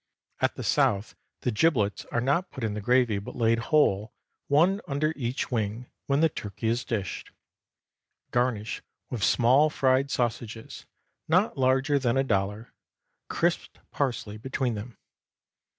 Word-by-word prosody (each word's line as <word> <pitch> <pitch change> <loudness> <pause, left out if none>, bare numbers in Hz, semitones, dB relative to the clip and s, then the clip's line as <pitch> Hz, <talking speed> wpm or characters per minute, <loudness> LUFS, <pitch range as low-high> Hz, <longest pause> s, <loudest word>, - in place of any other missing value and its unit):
At - - +1
the - - -6
South 100 +2 +1 0.3
the 125 - 0
giblets 105 -4 +1
are 120 - -2
not 145 +9 +1
put 130 - -8
in 110 -2 -1
the 105 - -4
gravy, 120 -2 +2
but 100 - -9
laid 115 -1 +2
whole, 110 -9 +3 0.4
one 175 +8 +3
under 150 +2 0
each 125 -1 -3
wing, 115 +1 -2 0.2
when 140 +2 +2
the 165 - +6
turkey 110 -5 -4
is 120 +3 0
dished. 100 -8 -4 1.0
Garnish 120 -3 -1 0.3
with 120 -5 -3
small 130 +6 +4
fried 135 -1 +2
sausages, 115 -3 -3 0.4
not 180 +7 +2
larger 135 +2 +2
than 125 -2 +1
a 135 - +3
dollar, 105 -1 -2 0.5
crisped - - -1
parsley 120 -6 -2
between 130 +1 -2
them. 110 +3 -7
125 Hz, 140 wpm, -27 LUFS, 110-140 Hz, 1.0 s, the